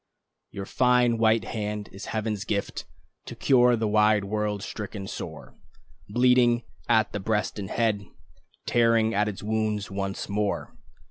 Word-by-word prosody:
Your 100 - -6
fine 125 0 +3
white 110 -1 +3
hand 105 -1 -4
is 100 +1 -9
Heaven's 110 -2 -2
gift 105 -2 -3 0.4
To - - -7
cure 125 -2 +4
the 110 -1 -1
wide 105 0 +3
world, 105 0 -2
stricken 105 -3 -6
sore, - - -7 0.6
Bleeding 120 +1 +4 0.3
at 110 -2 +3
the 105 - -3
breast 105 0 -1
and 95 -2 -5
head, 105 -4 0 0.6
Tearing 115 -1 +3
at 105 0 +2
its 105 -2 -5
wounds 110 -1 -1
once 95 0 -3
more. 100 0 -2
105 Hz, 140 wpm, -26 LUFS, 100-115 Hz, 0.6 s, cure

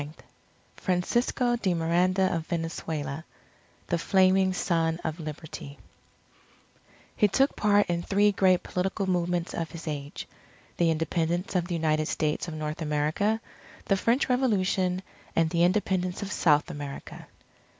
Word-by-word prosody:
JUNE 145 - -5
9 155 - -15 0.5
FRANCISCO 240 +7 +1
DE 190 -6 0
MIRANDA 180 +3 +2
OF 165 -1 -4
VENEZUELA 160 -3 -3 0.6
THE 175 - 0
FLAMING 190 +1 +4
SON 165 -2 0
OF 160 +1 -3
LIBERTY 155 -2 -7 1.4
_He 210 - +6
took 270 +7 +3
part 205 -1 +3
in 170 -1 -1
three 205 +3 +3
great 190 -2 +3
political 190 +2 -2
movements 175 -1 0
of 165 -2 -3
his 165 -1 -9
age: 145 -1 -5 0.5
the 170 -1 +3
Independence 165 +3 -1
of 175 -1 +1
the 175 - -2
United 155 -1 +1
States 155 +2 -1
of 165 - -5
North 155 +1 -4
America; 155 +8 0 0.5
the 195 - +3
French 230 +7 +1
Revolution; 190 -7 +1 0.3
and 165 -1 +2
the 170 -1 +2
Independence 185 0 +1
of 200 - -5
South 150 -7 +3
America. 145 -1 -8
175 Hz, 140 wpm, -27 LUFS, 160-190 Hz, 1.4 s, He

